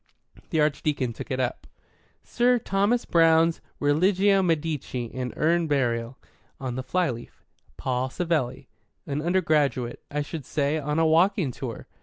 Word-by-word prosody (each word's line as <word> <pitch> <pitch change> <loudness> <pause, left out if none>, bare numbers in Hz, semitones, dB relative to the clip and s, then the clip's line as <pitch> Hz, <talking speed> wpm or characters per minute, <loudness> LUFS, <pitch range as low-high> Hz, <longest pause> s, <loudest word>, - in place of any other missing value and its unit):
The 160 - 0
Archdeacon 145 -4 0
took - - -8
it 130 - -2
up. 125 -1 -2 0.6
"Sir 245 +1 +2
Thomas 210 +2 +1
Browne's 165 0 +4 0.2
Religio 190 +7 +3
Medici 150 -8 -2
and 125 -1 -3
Urn 165 +2 +2
Burial. 120 -3 0 0.4
On 130 -2 -4
the 130 - -3
flyleaf, 130 -3 -3 0.3
'Paul 130 0 -1
Savelli.' 165 -4 -2 0.4
An 145 +1 -2
undergraduate, 155 -8 +1
I 150 0 -2
should 155 0 -6
say, 145 +3 0
on 150 +1 -2
a 165 - +3
walking 170 -1 +3
tour." 120 -2 -7
150 Hz, 135 wpm, -26 LUFS, 130-170 Hz, 0.6 s, Browne's